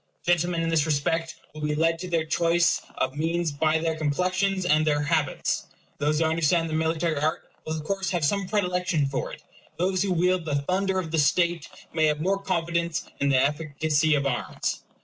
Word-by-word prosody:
Gentlemen 175 0 +1
in 165 - 0
this 160 -2 +2
respect 165 +3 0 0.2
will 155 - -9
be 150 0 0
led 165 +1 +1
to 180 - -6
their 165 -2 +1
choice 170 +1 +2
of 130 +1 -1
means 165 +2 0
by 155 +2 +1
their 160 0 -1
complexions 185 +5 0
and 155 -2 +3
their 145 -1 +1
habits. 155 -2 0 0.3
Those 150 +1 +1
who 160 - +2
understand 165 +1 +1
the - - -3
military 160 0 0
art 155 +4 0 0.2
will 155 - -1
of 155 - -6
course 195 +2 -2
have 170 -4 0
some 195 +5 0
predilection 180 -6 0
for 135 -1 -3
it. - - -11 0.3
Those 185 +1 +1
who 195 -1 0
wield 180 0 +1
the 150 -3 -1
thunder 190 +3 0
of 170 -4 -3
the 160 - +1
state 170 +2 +2 0.2
may 160 -1 +3
have 150 0 0
more 195 +5 0
confidence 170 -1 -1
in 140 - +2
the 135 - +4
efficacy 150 +2 +1
of 140 -1 0
arms. 130 -3 -2
165 Hz, 195 wpm, -26 LUFS, 155-175 Hz, 0.3 s, the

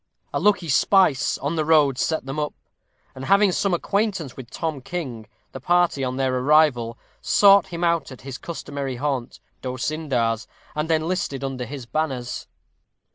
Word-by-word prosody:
A - - 0
lucky 205 -4 +2
spice 155 -3 +3
on 150 +4 -3
the 155 - +2
road 150 -4 +4
set 160 -1 0
them 135 +3 -4
up; 150 -1 -2 0.6
and 130 0 -7
having 200 +2 +4
some 195 +2 0
acquaintance 190 - -1
with 125 -3 -10
Tom 155 0 -3
King, 125 -8 -5 0.2
the 130 - -7
party, 175 -1 +2
on 130 0 -2
their 130 -1 +1
arrival, 130 -5 +3 0.2
sought 200 -1 +5
him 175 -2 -5
out 170 -4 +1
at 130 - -11
his 135 -1 -7
customary 140 -5 -5
haunt, 135 -2 -3 0.2
D'Osyndar's, 125 -3 -1 0.3
and 150 +2 -2
enlisted 160 -4 -1
under 130 -2 -3
his 135 -1 -7
banners. 130 -3 -3
145 Hz, 155 wpm, -23 LUFS, 130-170 Hz, 0.6 s, sought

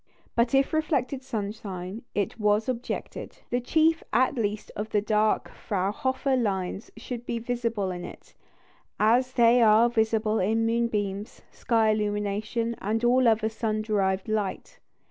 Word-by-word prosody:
But 235 +2 +2
if 270 +2 +2
reflected 285 -5 0
sunshine, 205 -4 -5
it 205 +3 -2
was 210 +1 +2
objected, 250 -1 -5
the 245 +1 +1
chief 320 +5 +2
at 255 +2 +3
least 215 -4 -3
of 215 +1 -4
the 210 - +2
dark 215 +1 +1
Fraunhofer 245 +8 -1
lines 195 -4 -2
should 245 -2 -6
be 240 -1 -3
visible 230 -4 -2
in 175 -1 -6
it, - - -11 0.7
as 245 +4 +3
they 240 0 +5
are 225 +1 +6
visible 220 -1 +1
in 225 +4 +1
moonbeams, 215 -3 -2
sky 225 -3 +2
illumination, 210 +2 -1
and 220 +3 -1
all 250 +1 +4
other 220 -1 +3
sun 220 -1 -2
derived 195 -3 0
light. 210 -3 -3
220 Hz, 140 wpm, -26 LUFS, 210-240 Hz, 0.7 s, are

